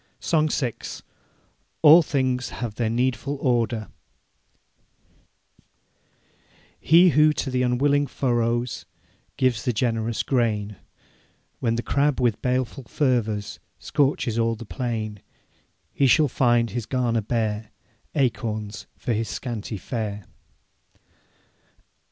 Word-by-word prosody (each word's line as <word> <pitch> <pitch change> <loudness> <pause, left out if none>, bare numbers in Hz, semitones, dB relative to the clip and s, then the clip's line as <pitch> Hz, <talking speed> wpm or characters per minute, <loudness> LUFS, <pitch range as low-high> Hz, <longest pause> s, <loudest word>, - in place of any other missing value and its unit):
SONG 155 -2 +1
VI. 125 -5 -1 1.1
ALL 160 +3 +9
THINGS 130 -5 -1
HAVE 120 -3 -5
THEIR 110 0 -1
NEEDFUL 130 +4 -1
ORDER 120 -4 0 2.9
He 175 +3 +6
who 150 +1 +5
to 135 -2 -3
th' 125 0 0
unwilling 140 +3 +2
furrows 120 -6 -1 0.5
Gives 125 -4 +1
the 125 - +1
generous 115 -1 -1
grain, 105 -6 0 0.8
When 115 -2 0
the 120 - -2
Crab 145 0 +1
with 120 -4 +1
baleful 130 +1 -1
fervours 115 -8 -1 0.2
Scorches 135 -5 0
all 115 0 +1
the 115 - -9
plain; 110 -4 -4 0.7
He 140 - +3
shall 150 +4 +5
find 120 -3 +2
his 115 0 -4
garner 120 -3 0
bare, 110 -1 -2 0.5
Acorns 115 -6 -2
for 120 - -2
his 110 -1 -2
scanty 110 +3 -5
fare. 105 -3 -4
120 Hz, 105 wpm, -24 LUFS, 110-130 Hz, 2.9 s, ALL